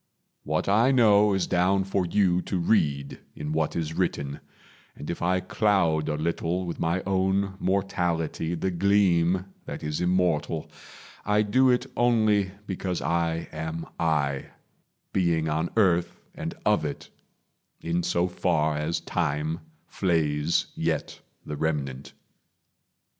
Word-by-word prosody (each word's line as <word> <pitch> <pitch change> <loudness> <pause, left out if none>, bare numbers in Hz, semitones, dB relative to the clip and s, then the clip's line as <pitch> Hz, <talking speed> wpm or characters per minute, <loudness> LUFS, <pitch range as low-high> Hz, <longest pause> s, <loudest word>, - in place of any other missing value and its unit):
What 80 +1 -1
I 110 +6 +4
know 105 -5 +5
Is 95 - +1
down 95 +2 +2
for 95 -1 -1
you 90 -1 +2
to 95 - -3
read 75 -7 +1 0.2
in 75 0 -5
what 80 0 0
is 80 -2 -2
written; 70 -2 -2 0.6
And 75 - -6
if 85 - -6
I 90 +2 +1
cloud 90 -6 +1
a 75 - 0
little 85 +3 -1
with 85 - -5
my 85 +3 0
own 95 +1 +1
Mortality 85 -4 -1
the 95 +3 -1
gleam 90 -1 +2 0.2
that - - -7
is 75 +1 -2
immortal, 90 -3 0 0.5
I 105 +1 +2
do 130 +5 +3
it 125 0 +2
only 110 -5 +3 0.2
because 95 -2 -3
I 85 0 -1
am 80 +1 -4
I 75 -4 0 0.7
Being 85 -4 +1
on 80 +2 0
earth 90 -5 +2
and - - -5
of - - +3
it, - - -5 0.7
in 85 +1 -1
so 85 +1 +1
far 80 -4 0
As 75 +3 -1
time 80 -1 -1 0.3
flays 80 -4 +1
yet - - -2 0.2
the 75 - -5
remnant. 70 -4 -3
85 Hz, 130 wpm, -26 LUFS, 80-95 Hz, 0.7 s, know